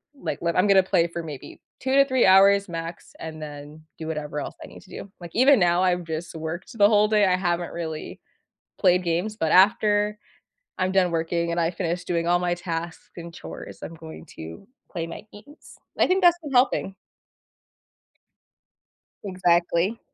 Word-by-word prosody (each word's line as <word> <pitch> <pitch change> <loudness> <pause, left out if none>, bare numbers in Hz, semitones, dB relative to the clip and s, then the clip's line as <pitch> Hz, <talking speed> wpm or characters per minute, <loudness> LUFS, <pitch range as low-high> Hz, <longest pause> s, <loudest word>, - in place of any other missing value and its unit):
like 280 - -5
like, 170 0 -1
I'm 185 +3 +3
gonna 195 -1 +5
play 170 -2 +2
for 170 0 -6
maybe 150 -5 -9 0.2
2 265 0 -1
to 275 0 +6
3 260 -2 +2
hours 195 +1 +5
max 165 0 -7
and 160 -1 -8
then 150 +1 -9 0.2
do 160 - -6
whatever 150 -2 -4
else - - -6
I - - -9
need - - -14
to - - -21
do. 195 - -9
Like, 170 -1 -9
even 260 +1 +5
now, 175 -1 +3
I've 180 -1 +1
just 160 +1 -6
worked 165 +7 -6
the 205 -1 +6
whole 210 -1 +4
day. 210 -1 +4
I 185 -1 +3
haven't 175 -2 -2
really 160 -2 -6 0.6
played 180 -1 +4
games, 175 +6 -1
but 160 -6 -1
after 210 +1 +3 0.6
I'm 185 0 0
done 190 -2 +3
working 170 +1 -1
and 170 - -2
I 165 0 +1
finished 175 0 -3
doing 170 -1 -1
all 175 0 +3
my 175 -1 0
tasks 170 -1 -6
and 170 -1 -9
chores, - - -10
I'm 165 - -7
going 160 - -11
to 80 - -10 0.2
play 165 -1 -4
my 165 - -8
games. 225 +9 -15 0.2
I - - +4
think 375 +1 +1
that's 350 -1 +5
been 295 -3 -7
helping. 245 -6 +2 2.3
Exactly. 180 +2 +1
175 Hz, 180 wpm, -24 LUFS, 165-200 Hz, 2.3 s, to